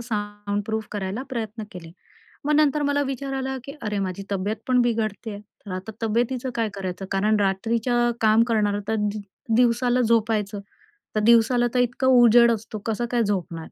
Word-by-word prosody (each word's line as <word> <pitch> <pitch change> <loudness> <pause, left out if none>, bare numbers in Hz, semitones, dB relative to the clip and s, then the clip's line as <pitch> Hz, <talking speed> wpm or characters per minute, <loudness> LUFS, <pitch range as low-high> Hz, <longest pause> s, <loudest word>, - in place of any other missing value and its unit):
Soundproof 205 -1 -3
करायला 200 +3 -3
प्रयत्न 225 -3 -4
केले. 165 -3 -10 0.5
मग 300 +1 +2
नंतर 300 -1 +3
मला 285 0 +1
विचार 270 0 -4
आला, 265 0 -2
की 275 - -7
अरे, 210 -2 -2
माझी 190 0 -3
तब्येत 200 +3 -1
पण 255 -1 +3
बिघडते 225 -2 -1
आहे, 205 -1 -7
तर 210 -1 -16
आता 190 +4 -6
तब्येतीचं 240 +3 0
काय 225 -2 0
करायचं? 190 -1 -5
कारण 210 +2 +2
रात्रीच्या 230 +5 +1
काम 220 +1 +5
करणारं 205 -2 +1
तर 220 - +1
दि 210 0 -1 0.4
दिवसाला 245 +1 +3
झोपायचं, 220 -3 +1 0.6
तर 215 - +3
दिवसाला 235 +2 +4
तर 250 - +2
इतका 245 +2 +1
उजेड 240 -2 +6
असतो, 220 0 -4
कसं 225 +1 -1
काय 240 -2 +2
झोपणार? 185 -5 -2
225 Hz, 165 wpm, -24 LUFS, 205-245 Hz, 0.6 s, उजेड